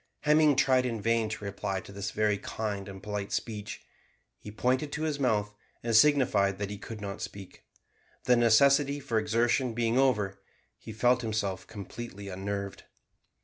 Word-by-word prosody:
Hemming 150 -1 +4
tried 130 -2 +3
in 115 -2 -3
vain 115 0 +1
to 105 -1 -6
reply 100 -1 -3
to - - -13
this 100 +1 -4
very 105 -2 +1
kind 105 -2 -4
and 95 -1 -10
polite 105 -1 -4
speech. 105 -3 -4 0.6
He - - -9
pointed 130 +7 0
to 155 - -3
his 150 -2 -1
mouth 105 -6 +1 0.3
and 115 -1 0
signified 110 -7 +4
that 100 0 -4
he 105 - -6
could 110 0 -8
not 100 -1 -5
speak. 100 -2 -9 0.6
The 125 - +4
necessity 140 +5 +4
for 120 -5 0
exertion 115 +2 +1
being 120 +1 +1
over, 105 -7 +1 0.4
he - - -9
felt 120 +3 +2
himself 105 -5 -2
completely 100 -1 -8
unnerved. 100 +1 -5
110 Hz, 160 wpm, -29 LUFS, 100-125 Hz, 0.6 s, Hemming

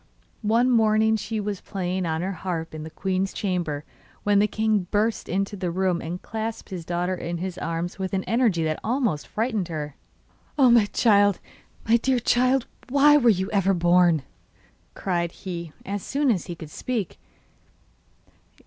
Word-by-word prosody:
One 230 +4 +3
morning 220 -1 +4
she 220 0 -3
was 205 -2 -3
playing 185 -2 -3
on 160 +1 -1
her 190 - -1
harp 170 -3 -4
in 155 - -6
the 155 - -7
queen's 190 +3 -1
chamber 175 -7 -2 0.4
when 205 -1 +4
the 210 - +4
king 215 -3 0
burst 215 +2 0
into 195 +3 -1
the 185 -2 -2
room 185 0 0
and 175 +3 -5
clasped 220 0 -5
his 180 -3 -5
daughter 175 +2 -1
in 175 -1 -4
his 185 +1 -4
arms 165 +3 -3
with 190 -1 -2
an 190 - -1
energy 225 -8 +2
that 155 -1 -1
almost 230 - 0
frightened 220 -4 -1
her. 150 -4 -5 0.6
'Oh, 260 -4 +6
my 235 -3 +6
child! 205 -2 +3 0.5
my 230 +1 +5
dear 260 +2 +1
child! 250 +2 +2 0.2
why 285 +2 +6
were 250 -5 +5
you 190 -2 +1
ever 195 -2 +2
born?' 175 -3 +4 0.7
cried 170 -3 -1
he, 170 -4 -6
as 200 +1 -3
soon 280 +3 +1
as 190 -6 -1
he 175 - -5
could 160 -2 -10
speak. 235 -7 -3
195 Hz, 165 wpm, -25 LUFS, 175-220 Hz, 0.7 s, Oh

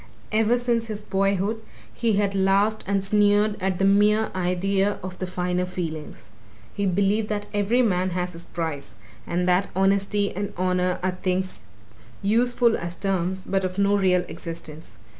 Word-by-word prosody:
Ever 225 +2 +3
since 235 -2 0
his 215 -1 -5
boyhood 195 +3 0 0.3
he 230 -2 0
had 200 -1 +1
laughed 195 +3 +2
and 195 -1 0
sneered 205 +1 +3
at 190 -1 0
the 195 - +2
mere 210 +2 +4
idea 190 +2 0
of 185 0 -7
the 185 - -3
finer 180 0 -1
feelings 165 -4 -5 0.5
he 200 -1 -1
believed 200 +3 +1
that 205 -1 -2
every 210 +5 +2
man 185 -4 +1
has 180 0 -3
his 165 +1 -8
price 145 - -5 0.3
and 180 +1 0
that 180 +2 +3
honesty 200 +1 +1
and 200 +1 -3
honour 180 0 +1
are 185 0 -1
things 185 - -2 0.6
useful 235 +2 +3
as 170 +1 -5
terms 190 0 -1
but 195 0 -1
of 185 0 -3
no 200 0 +3
real 180 -2 +2
existence. 165 -1 -8
195 Hz, 160 wpm, -24 LUFS, 180-205 Hz, 0.6 s, mere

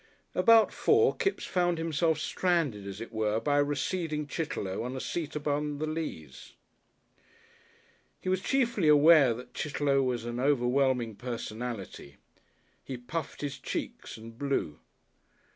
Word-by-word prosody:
About 230 -2 +5
four 440 +1 +3
Kipps 390 - -1
found 175 -2 +1
himself 160 0 +1
stranded, 155 - 0
as 100 +2 -7
it 115 - -7
were, 110 -1 0
by 145 +5 +1
a - - +5
receding 150 +2 -2
Chitterlow 145 - -3
on 125 +3 -4
a - - -3
seat 160 +1 -4
upon 150 0 -1
the 155 - -2
Leas. 155 - -6 1.7
He - - -9
was 185 0 +1
chiefly 235 -8 +1
aware 150 -4 +7
that 125 +2 -11
Chitterlow 145 -2 0
was 125 -3 -1
an 120 0 -4
overwhelming 125 -4 +1
personality. 115 - -6 0.7
He 130 - -6
puffed 140 +7 -5
his 140 -2 -4
cheeks 125 - -5
and 115 +1 -11
blew. 140 - -1
145 Hz, 135 wpm, -29 LUFS, 120-160 Hz, 1.7 s, aware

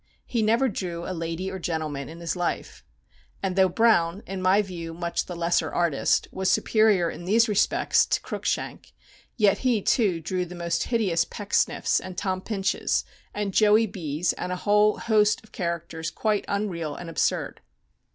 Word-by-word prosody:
He 235 - -1
never 230 +5 +3
drew 175 -6 -4
a 185 - -3
lady 165 +2 -4
or 190 - -5
gentleman 155 -5 -3
in 165 +2 -10
his 170 - -2
life. 170 - -3 0.6
And 190 -2 -1
though 190 -1 +4
Browne, 190 -3 +2
in 190 0 -5
my 190 +3 +4
view 170 -4 -7
much 170 0 -2
the 180 - -6
lesser 170 +1 0
artist, 170 -5 +1
was 190 0 -1
superior 215 -6 +3
in 175 - -9
these 225 +5 +4
respects 210 -1 +2
to - - 0
Cruikshank, - - -4 0.4
yet 205 -3 +3
he 250 -4 +2
too 195 -4 +2
drew 180 +3 -2
the 180 0 -8
most 170 -1 -1
hideous 200 -8 +1
Pecksniffs, 220 +3 0
and 185 -1 -9
Tom 185 -1 -1
Pinches, 195 -2 -1 0.3
and 205 -2 -3
Joey 215 +2 +5
B.'s, 170 -4 -2
and 180 - -5
a - - -1
whole 210 +1 +4
host 215 -2 +2
of 220 - -20
characters 170 -2 -4
quite 215 -2 -1
unreal 180 -7 -2
and 175 - -8
absurd. 165 - -1
185 Hz, 170 wpm, -25 LUFS, 170-210 Hz, 0.6 s, Joey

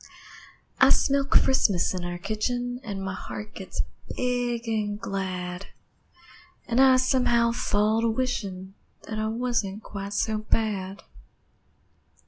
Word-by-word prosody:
I - - +7
smell 280 0 +3
Christmas 215 -10 +3
in 180 -1 -4
our 175 0 -4
kitchen, 245 +5 -2
An' 200 -5 -5
my 190 -1 -3
heart 210 +3 -7
gets 190 - -4 0.3
big 245 -2 -1
an' 210 -2 -1
glad, 185 -2 -4 1.0
An' 240 +1 +1
I, 265 -1 +7
somehow, 250 -3 +3
fall 215 -1 +1
to 230 - +2
wishin', 200 -6 -2 0.3
That 215 -1 -5
I 215 - 0
wasn't 225 -3 -1
quite 200 0 -6
so 215 +1 0
bad. 210 -3 -1
215 Hz, 120 wpm, -26 LUFS, 195-245 Hz, 1.0 s, I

